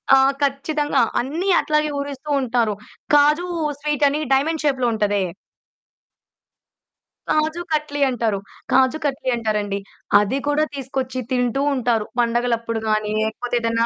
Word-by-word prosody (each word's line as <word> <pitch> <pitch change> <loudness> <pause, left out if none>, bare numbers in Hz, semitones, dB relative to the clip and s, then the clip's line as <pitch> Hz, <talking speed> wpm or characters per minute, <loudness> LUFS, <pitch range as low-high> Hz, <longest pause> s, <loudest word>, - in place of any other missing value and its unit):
ఆ! - - +6 0.2
ఖచ్చితంగా 285 +1 +1 0.2
అన్ని 320 +10 -2
అట్లాగే 300 0 +1
ఊరిస్తూ 280 +1 -6
ఉంటారు. 235 -4 +1 0.4
కాజు 300 +4 +4 0.3
స్వీటని 295 0 +1
డైమండ్ 310 +4 +1
షేప్‌లో 260 -4 +2
ఉంటదే. 205 -2 +1 2.1
కాజు 310 +2 +1
కట్లి 300 -1 -1
అంటారు. 225 -5 -1 0.3
కాజు 260 +2 +4
కట్లి 275 -1 -1
అంటారండి. 210 -3 -1 0.4
అది 210 +6 0
కూడా 290 +1 +2
తీసుకొచ్చి 260 -1 -3
తింటూ 250 +1 +1
ఉంటారు. 235 -4 +1
పండగలప్పుడు 230 -1 0
గాని 215 0 0
లేకపోతే 230 +3 -2
ఏదన్నా 230 0 +1
260 Hz, 115 wpm, -21 LUFS, 230-290 Hz, 2.1 s, ఆ